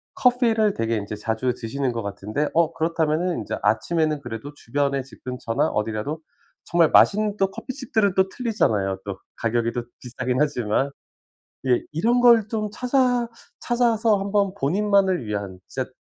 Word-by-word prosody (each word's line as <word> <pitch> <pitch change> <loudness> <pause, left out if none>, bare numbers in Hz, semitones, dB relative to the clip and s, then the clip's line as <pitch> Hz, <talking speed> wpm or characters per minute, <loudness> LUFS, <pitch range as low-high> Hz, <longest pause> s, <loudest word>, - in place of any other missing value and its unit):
커피 245 -2 +3
를 215 -2 +2
되게 115 0 -1
인제 105 +1 -4
자주 110 +4 -1
드시는 125 +3 -2
것 115 - -3
같은데 105 +8 -2
어, 165 -1 +2
그렇다면은 165 -1 0
이제 - - -4
아침에는 155 +5 +1
그래도 120 +4 -7
주변에 140 +2 -1
집 135 - -17
근처나 125 -2 -1
어디라도 110 +8 -2 0.4
정말 170 -2 +3
맛있는 210 0 +4
또 195 0 +1
커피집들은 220 -7 -1
또 190 0 +3
틀리잖아요. 105 - 0
또 100 -2 -5 0.2
가격이 115 0 0
또 120 - -2 0.2
비싸긴 125 0 -3
하지만. 135 -2 +1 0.8
예, 125 -1 +3
이런 235 +10 +2
걸 230 -3 +6
좀 215 -3 -2
찾아 250 -1 +1 0.3
찾아서 230 -3 +2
한번 200 -1 0
본인만을 195 - +2
위한 100 -3 -4
진짜 130 -1 -4
155 Hz, 335 characters per minute, -23 LUFS, -, 0.8 s, 걸